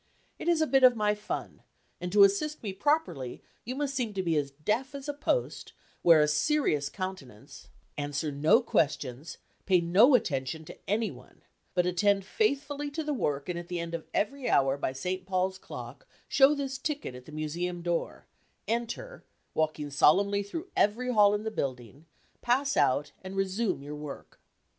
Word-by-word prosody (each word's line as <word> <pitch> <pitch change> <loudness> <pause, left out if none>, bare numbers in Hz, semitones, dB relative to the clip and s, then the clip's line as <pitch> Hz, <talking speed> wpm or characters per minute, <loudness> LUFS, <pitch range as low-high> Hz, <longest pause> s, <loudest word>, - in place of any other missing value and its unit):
It - - -6
is 335 -2 +3
a - - +4
bit 270 -3 +3
of 250 -1 +8
my 210 -1 +2
fun, 210 0 -6 0.4
and 180 0 -4
to 205 +1 +7
assist 265 +11 +2
me 200 -3 -3
properly 190 - -1 0.2
you 250 +3 -4
must 280 0 -2
seem 240 -6 -2
to 190 - -1
be 165 -2 +1
as 145 -2 0
deaf 215 - -2
as 280 0 -7
a 290 - -2
post; 290 +12 -2 0.3
wear 165 -3 +7
a 150 - +4
serious 150 - +1
countenance; 145 - -8 0.3
answer 145 +1 -2
no 155 - +4
questions; 145 - -1 0.3
pay 185 -2 +5
no 195 +11 +5
attention 145 - -1
to - - -12
any 215 +2 +1
one; - - -16 0.3
but 180 -1 +3
attend 195 +2 +2
faithfully 290 - -1
to 315 +3 -4
the 300 -1 -1
work 145 - -1
and 175 -1 -3
at 175 - -9
the 175 -1 -3
end 170 0 -5
of 165 -1 -5
every 270 +4 -1
hour 135 0 +3
by 140 - -2
St. 180 +8 -3
Paul's 190 0 0
clock - - -9 0.2
show 275 +2 +5
this 270 -2 -4
ticket 290 - -3
at 125 0 -11
the - - -12
Museum 170 +3 -3
door; 175 -1 -2 0.4
enter, 235 - -3 0.3
walking 155 -2 -1
solemnly 200 +8 +4
through 320 - -7
every 250 +5 +1
hall 205 -2 +5
in 210 - -3
the 220 - -3
building; 130 - -5 0.3
pass 275 +4 +1
out, 145 +3 +2
and 190 +1 -7
resumé 195 -4 -1
your 145 +1 -6
work." 150 -1 -9
190 Hz, 180 wpm, -29 LUFS, 155-255 Hz, 0.4 s, of